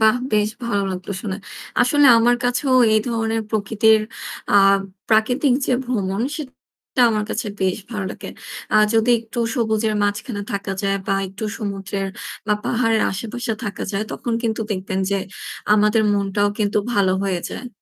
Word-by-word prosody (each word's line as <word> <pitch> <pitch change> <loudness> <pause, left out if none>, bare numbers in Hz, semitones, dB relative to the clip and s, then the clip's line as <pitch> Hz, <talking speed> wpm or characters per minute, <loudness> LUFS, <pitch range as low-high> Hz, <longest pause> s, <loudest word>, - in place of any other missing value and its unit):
বাহ! 220 +2 +5 0.2
বেশ 210 0 +3 0.2
ভালো 205 -4 0
লাগলো 185 +2 -5
শুনে। 190 -3 -3 0.4
আসলে 285 +4 +5
আমার 240 +1 +4
কাছেও 255 +2 +1 0.2
এই 215 - +4
ধরনের 225 -1 0
প্রকৃতির 220 +1 +3 0.5
আ - - +4 0.5
প্রাকৃতিক 245 +5 +3
যে - - +1
ভ্রমণ 200 -4 -1
সেটা 260 -3 -4
আমার 210 -1 0
কাছে 215 - -2
বেশ 185 -1 +1
ভালো 210 -4 -3
লাগে। - - -8 0.4
আ - - +5 0.2
যদি 225 +2 +3
একটু 230 +2 -8 0.2
সবুজের 220 -2 +1
মাঝখানে 205 +1 -2
থাকা 200 0 -3
যায় 195 0 +1
বা 195 - +1
একটু 195 +3 -7
সমুদ্রের 195 -2 -3 0.4
বা 210 - +2
পাহাড়ের 225 -2 +2
আশেপাশে 230 +4 -3
থাকা 205 - -4
যায় 200 +2 0
তখন 240 - -3
কিন্তু 225 -1 -1
দেখবেন 190 -1 -2
যে 200 - +2 0.6
আমাদের 210 +1 +3
মনটাও 205 0 +1
কিন্তু 210 -1 +1
ভালো 195 -4 +3
হয়ে 185 -3 -1
যায়। 250 - -6
215 Hz, 155 wpm, -21 LUFS, 200-230 Hz, 0.6 s, বাহ